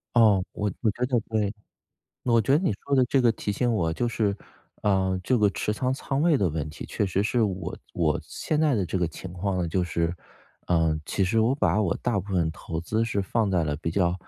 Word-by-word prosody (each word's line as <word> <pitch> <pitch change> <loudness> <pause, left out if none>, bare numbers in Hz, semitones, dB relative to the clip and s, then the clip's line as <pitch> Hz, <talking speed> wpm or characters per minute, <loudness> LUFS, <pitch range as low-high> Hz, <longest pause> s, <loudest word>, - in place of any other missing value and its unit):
哦， 105 -5 +5
我 105 -1 -2
我 110 -4 +3
觉 120 +4 -4
得 125 -3 +2
对， 110 -2 -1 0.7
我 120 -2 +4
觉 125 +6 +1
得 170 - 0
你 145 - +2
说 140 - +1
的 130 - +5
这 135 - +3
个 115 -2 +5
提 105 - -4
醒 120 +3 +1
我 85 -7 +1
就 120 +8 -1
是， 105 -4 0 0.5
呃， 95 -2 +2
这 125 +2 +2
个 105 -1 +4
持 100 +3 -2
仓 130 +4 -1
仓 135 +1 -2
位 165 -2 +4
的 95 -8 +1
问 75 -1 -3
题， 75 - -8
确 100 - -1
实 95 +2 0
是 120 +3 +1
我 95 -4 -2 0.2
我 80 -3 +1
现 155 -1 -2
在 150 -4 +3
的 100 -4 +1
这 90 +3 -2
个 85 -2 +1
情 90 +2 -9
况 95 +1 -2
呢， - - -1
就 90 +2 0
是， 85 0 -1 0.5
呃， 80 -3 +2
其 95 - 0
实 110 +5 +2
我 120 +4 +3
把 110 -6 +2
我 95 -5 +1
大 115 -6 0
部 100 +2 -10
分 85 -3 +2
投 80 -1 -6
资 110 +7 -1
是 100 -3 -1
放 105 +1 0
在 85 -3 +2
了 75 -1 -1
比 80 +2 -3
较 90 -1 +1
100 Hz, 255 characters per minute, -26 LUFS, 90-115 Hz, 0.7 s, 哦